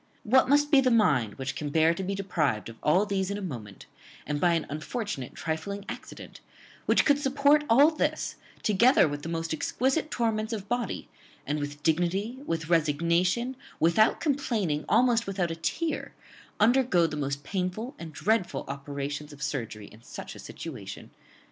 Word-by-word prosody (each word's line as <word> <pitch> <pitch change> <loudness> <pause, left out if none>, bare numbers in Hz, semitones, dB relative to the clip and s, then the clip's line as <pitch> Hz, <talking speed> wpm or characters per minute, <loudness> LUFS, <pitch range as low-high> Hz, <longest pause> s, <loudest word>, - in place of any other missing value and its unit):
what 255 +3 +4
must 290 +1 +4
be 280 -3 +7
the 260 - +3
mind 150 - +3
which 135 0 -4
can 150 - -3
bear 160 +2 +4
to 170 - -5
be 195 +1 -2
deprived 155 - -1
of 115 - -11
all 180 +7 +3
these 195 -2 -1
in 200 - -2
a - - -4
moment, 120 - -7 0.4
and 145 0 -2
by 175 -1 +4
an 165 - -1
unfortunate 155 - -4
trifling 180 +6 -4
accident; - - -9 0.5
which - - +4
could 285 -1 +4
support 285 +1 +3
all 280 +7 +7
this, 310 - -1 0.3
together 230 - +5
with 145 0 -4
the 165 - -6
most 165 -1 -2
exquisite 265 - 0
torments 225 -3 -1
of 205 -2 -5
body, 240 -3 -2 0.4
and 150 +2 -1
with 145 0 -6
dignity, 180 +9 0
with 160 -1 -2
resignation, 170 - +1 0.2
without 170 +7 +4
complaining, 225 - 0
almost 240 -2 +3
without 185 -3 -1
a - - -3
tear, 320 - -3 0.4
undergo 225 -5 +4
the 155 -2 -3
most 140 -1 -3
painful 195 - -3
and 165 -2 -7
dreadful 185 -6 0
operations 140 +2 -5
of 145 0 -9
surgery 115 -8 -4
in 110 +2 -15
such - - -8
a - - -12
situation!" - - -8
180 Hz, 165 wpm, -28 LUFS, 150-230 Hz, 0.5 s, be